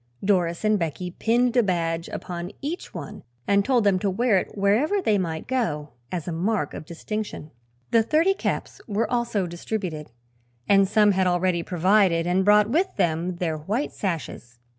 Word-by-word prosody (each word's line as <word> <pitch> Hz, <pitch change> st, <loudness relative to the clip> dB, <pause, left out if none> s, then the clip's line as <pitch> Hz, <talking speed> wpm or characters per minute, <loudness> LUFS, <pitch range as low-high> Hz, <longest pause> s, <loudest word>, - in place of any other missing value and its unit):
Doris 175 Hz, -3 st, +1 dB
and 215 Hz, -1 st, +3 dB
Becky 175 Hz, +2 st, -3 dB
pinned 240 Hz, +5 st, +1 dB
a 245 Hz, -, +6 dB
badge 170 Hz, -4 st, -1 dB
upon 175 Hz, 0 st, -5 dB
each 315 Hz, +6 st, -5 dB
one -, -, -8 dB, 0.3 s
and 200 Hz, 0 st, +3 dB
told 245 Hz, 0 st, +2 dB
them 195 Hz, -2 st, +3 dB
to 200 Hz, -, 0 dB
wear 210 Hz, +1 st, +2 dB
it -, -, -8 dB
wherever 225 Hz, -, +2 dB
they 215 Hz, -, +2 dB
might 160 Hz, -3 st, -3 dB
go, 160 Hz, -, -1 dB, 0.2 s
as 175 Hz, -3 st, -4 dB
a -, -, -2 dB
mark 175 Hz, -1 st, -1 dB
of -, -, -7 dB
distinction. 205 Hz, -2 st, -5 dB, 0.4 s
The 230 Hz, -, +5 dB
thirty 315 Hz, -, +3 dB
caps -, -, -3 dB
were 215 Hz, +1 st, -1 dB
also 235 Hz, -5 st, 0 dB
distributed 175 Hz, -3 st, -5 dB, 0.6 s
and 195 Hz, -1 st, +5 dB
some 210 Hz, +1 st, +4 dB
had 190 Hz, -1 st, +2 dB
already 175 Hz, -1 st, +1 dB
provided 180 Hz, 0 st, +2 dB
and 180 Hz, +2 st, +2 dB
brought 210 Hz, +1 st, +5 dB
with 360 Hz, +7 st, +1 dB
them 170 Hz, +2 st, 0 dB
their 165 Hz, -3 st, -2 dB
white 215 Hz, -, -2 dB
sashes. 155 Hz, -, -5 dB
195 Hz, 170 wpm, -24 LUFS, 170-220 Hz, 0.6 s, a